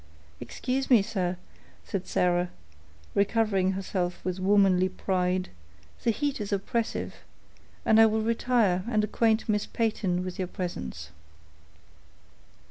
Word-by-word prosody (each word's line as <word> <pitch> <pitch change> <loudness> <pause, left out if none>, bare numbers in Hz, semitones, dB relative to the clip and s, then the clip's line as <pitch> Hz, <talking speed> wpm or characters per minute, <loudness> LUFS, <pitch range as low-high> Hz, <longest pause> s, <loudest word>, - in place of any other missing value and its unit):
"Excuse 265 +1 -3
me, 235 -6 +6
sir," 185 -3 -2 0.5
said 190 -2 -4
Sarah, 180 0 +1 0.6
recovering 200 -2 +2
herself 185 -2 -2
with 185 0 -2
womanly 190 -1 +4
pride; 185 -1 -1 0.5
"the - - +2
heat 280 +1 -1
is 205 - -4
oppressive, 220 +3 -2 0.7
and 220 0 +6
I 225 - +8
will 220 0 0
retire 225 -5 +2
and 215 -3 +2
acquaint 220 +1 +1
Miss 210 -1 0
Peyton 195 -5 -1
with 185 0 -6
your 185 - -1
presence." 80 - -5
195 Hz, 120 wpm, -27 LUFS, 180-220 Hz, 0.7 s, I